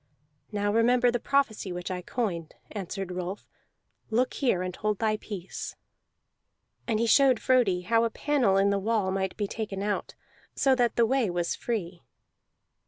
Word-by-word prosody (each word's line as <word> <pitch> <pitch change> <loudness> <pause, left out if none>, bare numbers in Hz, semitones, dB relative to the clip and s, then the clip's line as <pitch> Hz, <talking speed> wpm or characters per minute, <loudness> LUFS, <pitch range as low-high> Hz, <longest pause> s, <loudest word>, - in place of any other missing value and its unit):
"Now 205 -1 0
remember 240 +2 +4
the 240 - -1
prophecy 240 -8 0
which 175 +1 -5
I 180 -1 -3
coined," 180 -6 -3 0.2
answered 195 -2 -5
Rolf. 180 +2 -5 0.6
"Look 240 +3 +1
here 235 -10 +1
and 185 0 -4
hold 210 -1 -1
thy 215 0 +1
peace." 195 -4 -7 1.1
And 220 -3 +1
he 230 - +2
showed 260 +1 +5
Frodi 235 -9 +3
how 230 +5 +2
a 230 - +2
panel 250 -7 +1
in 200 +1 +4
the 200 - +1
wall 210 -2 0
might 190 -1 -2
be 210 - 0
taken 200 -2 -4
out, 205 0 -2 0.4
so 270 - +3
that 245 -3 +2
the 235 - +4
way 255 -3 +1
was 175 -1 -1
free. 185 -7 -4
210 Hz, 165 wpm, -28 LUFS, 190-235 Hz, 1.1 s, showed